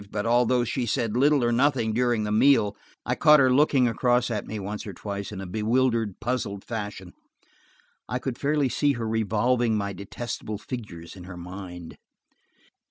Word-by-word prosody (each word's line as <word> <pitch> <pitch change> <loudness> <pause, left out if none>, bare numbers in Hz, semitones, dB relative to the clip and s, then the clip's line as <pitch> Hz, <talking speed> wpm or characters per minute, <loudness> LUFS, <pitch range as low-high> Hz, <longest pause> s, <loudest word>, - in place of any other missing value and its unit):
But 105 +1 -3
although 120 +1 +3
she 120 +1 -2
said 110 0 -1
little 140 +1 +4
or 120 - +2
nothing 120 -3 +2
during 120 -1 +1
the 105 - -2
meal, 110 -2 +4 0.3
I - - 0
caught 150 -1 +6
her 130 -2 +4
looking 135 -2 +4
across 120 +1 +1
at 105 -3 -3
me 110 - -5
once 105 +2 -5
or 100 - -6
twice 100 +2 -6
in 100 - -6
a 95 - -5
bewildered, 115 +1 0
puzzled 115 -5 -3
fashion. 105 -5 -6 1.0
I 125 - -1
could 125 -1 -5
fairly 145 -1 +1
see 145 +3 +1
her 115 -3 -4
revolving 110 +1 +1
my 100 -1 -2
detestable 105 +2 -6
figures 100 -8 -8
in 90 -2 -11
her 90 -1 -9
mind. 90 -1 -9
115 Hz, 170 wpm, -26 LUFS, 100-125 Hz, 1.0 s, caught